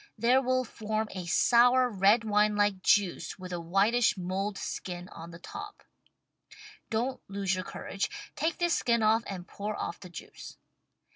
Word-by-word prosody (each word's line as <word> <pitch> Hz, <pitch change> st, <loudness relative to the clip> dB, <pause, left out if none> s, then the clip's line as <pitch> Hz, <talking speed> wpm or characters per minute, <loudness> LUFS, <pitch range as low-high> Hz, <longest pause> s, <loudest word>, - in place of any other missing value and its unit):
There 245 Hz, +4 st, +4 dB
will 255 Hz, 0 st, +1 dB
form 220 Hz, -2 st, -3 dB
a 185 Hz, -2 st, -6 dB
sour 245 Hz, +7 st, +5 dB
red 210 Hz, +1 st, +3 dB
wine 210 Hz, -1 st, +2 dB
like 205 Hz, -2 st, +1 dB
juice 200 Hz, -2 st, +2 dB
with 185 Hz, -1 st, -8 dB
a 175 Hz, -, -2 dB
whitish 200 Hz, +7 st, +2 dB
mold 190 Hz, +3 st, -3 dB
skin 180 Hz, -1 st, -5 dB
on 165 Hz, +1 st, -10 dB
the 170 Hz, -, -10 dB
top. 415 Hz, -, -9 dB, 1.1 s
Don't 245 Hz, +4 st, -1 dB
lose 195 Hz, -1 st, -1 dB
your 185 Hz, 0 st, -2 dB
courage, 195 Hz, +2 st, -4 dB, 0.3 s
take 320 Hz, +2 st, -1 dB
this 345 Hz, -1 st, +1 dB
skin 235 Hz, -2 st, +2 dB
off 220 Hz, +1 st, +4 dB
and 185 Hz, -2 st, -6 dB
pour 210 Hz, +1 st, -5 dB
off -, -, -4 dB
the 180 Hz, -, -11 dB
juice. 170 Hz, -, -10 dB
210 Hz, 160 wpm, -29 LUFS, 185-235 Hz, 1.1 s, sour